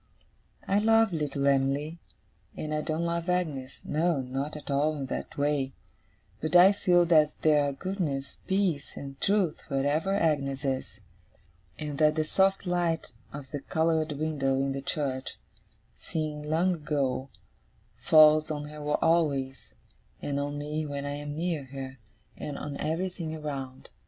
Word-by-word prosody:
I 200 +1 +3
love 225 -1 +4
little 145 -3 -1
Em'ly, 140 +4 +1 0.6
and 155 0 -3
I 150 - 0
don't 160 +2 -2
love 170 +1 -2
Agnes 150 -8 -2
no, 160 0 +1
not 135 +4 -3
at 150 - -7
all 150 +3 +2
in 140 - -3
that 130 - -5
way 140 -2 0 0.7
but 155 +3 -2
I 180 +2 +9
feel 175 -3 +4
that 155 -3 +4
there 150 -2 +5
are - - -2
goodness, 140 -4 -3
peace, 190 -7 0
and 135 -1 -8
truth, 195 -6 +2
wherever 145 +6 0
Agnes 145 -6 0
is; 130 -1 -3 0.8
and 150 -2 -5
that 155 0 +4
the 155 - +2
soft 195 +5 +2
light 175 -5 0 0.2
of 140 -2 -9
the 145 - -3
coloured 160 +1 0
window 145 -3 0
in 135 +1 0
the 135 0 -3
church, 135 -2 -3 0.6
seen 150 -2 -4
long 175 +4 +2
ago, 140 -4 -1 0.7
falls 155 0 +7
on 150 -1 -4
her 150 0 -9 0.2
always, 140 -5 +1 0.4
and 140 -1 -2
on 145 0 -3
me 150 +2 -3
when 140 -1 -4
I 145 - -3
am 145 0 -5
near 165 -4 -1
her, 135 0 -8 0.4
and 145 - -5
on 145 -1 -5
everything 165 0 -2
around. 135 -4 -6
150 Hz, 150 wpm, -28 LUFS, 140-165 Hz, 0.8 s, I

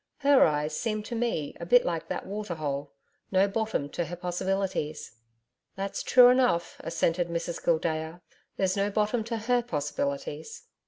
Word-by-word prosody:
HER 280 -1 +6
eyes 150 0 -1
seemed 215 0 -2
to 240 - -6
me 225 -11 -2
a 170 - -5
bit 245 +6 +6
like 165 -1 -2
that - - -4
water 205 -2 -4
hole 140 -2 -3 0.4
No 190 +1 +4
bottom 215 -7 -1
to 175 - -2
her 175 +3 -6
possibilities.' 180 - -2 0.6
'That's 195 0 -3
true 250 -1 +7
enough,' 250 -10 +2
assented 165 +1 0
Mrs 170 0 -4
Gildea. 160 0 0 0.4
'There's 190 -1 +1
no 200 0 +1
bottom 215 +3 0
to 230 0 -3
HER 245 +3 +1
possibilities.' 145 -4 -4
180 Hz, 155 wpm, -28 LUFS, 160-215 Hz, 0.6 s, true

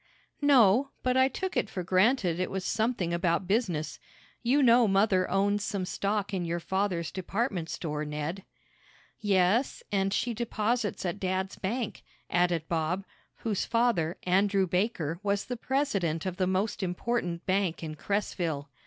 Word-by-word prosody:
"No, 265 -3 +5
but 255 0 +1
I 260 0 +5
took 375 +8 -4
it - - 0
for 180 - -4
granted 185 -1 +2
it 185 - -1
was 190 -1 -4
something 220 -7 0
about 170 +1 +1
business. 175 - -1 0.4
You 270 +4 +3
know 240 -1 +6
mother 195 -2 +3
owns 200 +2 +1
some 200 -2 -2
stock 200 +2 -2
in 185 -2 -1
your 170 0 -2
father's 185 -2 -1
department 190 -2 -2
store, 150 -2 -3
Ned." 150 +5 -4 0.8
"Yes, 205 +4 +2
and 195 -1 +1
she 235 +4 0
deposits 225 -2 -1
at 180 +3 -2
dad's 190 0 -1
bank," 225 +3 -3 0.3
added 175 -2 +1
Bob, 170 +4 -1 0.4
whose 210 -4 0
father, 230 -8 +1
Andrew 195 +1 +3
Baker, 180 -4 -1
was 200 -1 0
the 250 - -4
president 205 - -1
of 185 -1 -3
the 185 -2 +1
most 190 +4 0
important 180 -1 -2
bank 185 -3 0
in 155 -1 -4
Cresville. 165 -5 -2
195 Hz, 150 wpm, -29 LUFS, 175-220 Hz, 0.8 s, know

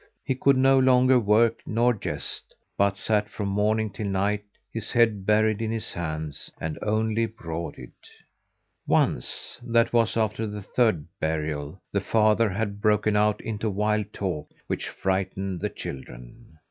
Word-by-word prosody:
He - - 0
could 135 +1 +3
no 135 +1 +5
longer 130 0 +5
work 110 +1 +3
nor 120 +2 +2
jest, 105 - -4 0.2
but 100 0 +2
sat 105 0 +1
from 100 0 -4
morning 105 +2 +1
till 105 +1 -4
night, 100 +2 0 0.3
his 115 -2 -2
head 110 -5 +2
buried 110 0 +3
in 110 - -1
his 115 -1 -2
hands, 80 -3 -4
and 80 -1 -4
only 110 +1 +1
brooded. 85 - -7 1.0
Once - - 0
that 115 -1 +2
was 115 -1 +2
after 110 0 0
the 105 -1 -6
third 110 -10 +1
burial 75 +1 -3
the 100 - 0
father 110 +2 +3
had 100 +1 -3
broken 105 0 +2
out 105 0 +2
into 110 -1 -2
wild 105 +1 0
talk, 90 -9 -3 0.2
which - - -3
frightened 95 -1 -2
the - - -1
children. 65 - -9
105 Hz, 145 wpm, -26 LUFS, 95-115 Hz, 1.0 s, no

